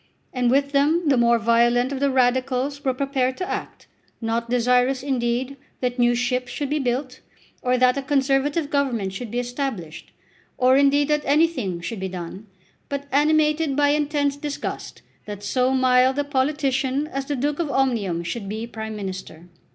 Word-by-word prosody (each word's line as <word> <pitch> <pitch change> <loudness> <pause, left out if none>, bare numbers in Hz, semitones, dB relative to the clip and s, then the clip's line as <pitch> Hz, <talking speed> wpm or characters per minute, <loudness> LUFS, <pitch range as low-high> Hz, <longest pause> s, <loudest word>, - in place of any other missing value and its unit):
And 250 -2 +1
with 280 +2 +2
them 300 +4 +2
the 275 - +4
more 235 -1 +4
violent 235 +3 +2
of 275 - -3
the 280 0 +2
Radicals 260 +2 0
were 265 - +2
prepared 260 -1 -1
to 365 - -3
act, - - -5 0.3
not 230 0 -2
desirous, 250 +2 +2
indeed, 255 0 -1 0.2
that 250 0 -2
new 240 0 +4
ships 245 0 -1
should 285 -2 -4
be 300 - +1
built, 255 0 -2 0.4
or 250 0 +1
that 255 +2 +3
a - - -3
Conservative 285 +2 0
Government 240 -9 0
should 225 +4 -6
be 240 - -4
established, 245 - -4 0.5
or, 255 0 +4
indeed, 280 +1 +4
that 300 0 +2
anything 280 - +1
should 200 +5 -5
be 190 0 -3
done, 185 +3 -7 0.4
but 280 0 -4
animated 300 0 +2
by 290 0 +3
intense 290 -1 +1
disgust 285 0 -6 0.2
that 205 -1 -7
so 250 +5 +1
mild 260 0 +3
a 290 - +1
politician 275 -1 0
as 275 -3 -4
the 290 - -2
Duke 290 +4 -1
of 330 -4 -1
Omnium 230 -11 0
should 200 +3 -5
be 220 +2 -4
Prime 220 -2 -6
Minister. 190 -4 -7
260 Hz, 170 wpm, -23 LUFS, 235-280 Hz, 0.5 s, the